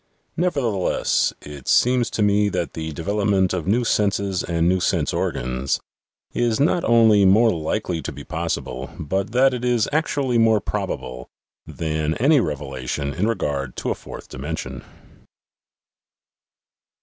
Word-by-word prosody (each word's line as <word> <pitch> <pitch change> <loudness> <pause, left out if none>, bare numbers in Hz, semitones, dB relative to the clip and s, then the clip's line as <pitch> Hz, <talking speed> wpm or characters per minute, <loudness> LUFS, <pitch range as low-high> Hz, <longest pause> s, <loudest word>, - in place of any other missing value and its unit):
Nevertheless, 135 - +1
it 70 -3 -10
seems 125 -1 +3
to 105 - -1
me 105 0 +3
that 90 -3 -3
the 80 0 -4
development 95 +3 +1
of 90 -2 -3
new 115 +5 +2
senses 100 -4 +1
and 85 -1 0
new 95 +1 +3
sense - - 0
organs 65 +2 -1 0.5
is 120 -2 +1
not 165 +4 +2
only 110 -3 +5
more 110 +5 +5
likely 85 +1 -2
to - - -5
be - - -9
possible, 65 +1 -4
but 95 +7 -2
that 130 +3 +4
it 125 -1 -4
is 120 -3 +2
actually 140 -5 +1
more 110 -1 +4
probable, 60 -9 -4 0.4
than 80 -1 -2
any 140 +4 +4
revelation 70 - -3
in 95 +6 0
regard 70 - -2
to - - -2
a - - +2
fourth - - -10
dimension. 75 +5 -6
100 Hz, 135 wpm, -22 LUFS, 80-115 Hz, 0.5 s, only